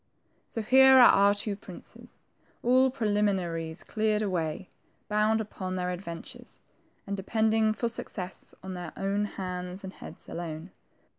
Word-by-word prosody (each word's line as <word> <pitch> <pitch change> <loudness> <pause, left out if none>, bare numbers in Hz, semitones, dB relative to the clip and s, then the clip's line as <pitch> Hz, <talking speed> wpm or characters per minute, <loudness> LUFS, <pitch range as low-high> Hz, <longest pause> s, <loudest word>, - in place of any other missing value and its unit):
So 225 - -3
here 265 +3 +7
are - - +9
our 200 +1 +5
two 205 0 -1
princes, 190 -2 -13 0.4
all 255 +2 +5
preliminaries 195 -9 -1
cleared 215 -1 0
away, 175 -3 -2 0.4
bound 215 +1 +2
upon 190 -3 -5
their 180 0 -1
adventures, 195 +8 -8 0.5
and 200 - -3
depending 220 +2 +1
for 235 - -1
success 190 -5 -6
on 190 0 -6
their 175 -3 -6
own 200 +1 0
hands 180 -1 -6
and 190 0 -7
heads - - -11
alone. 165 +1 -6
200 Hz, 135 wpm, -28 LUFS, 180-220 Hz, 0.5 s, are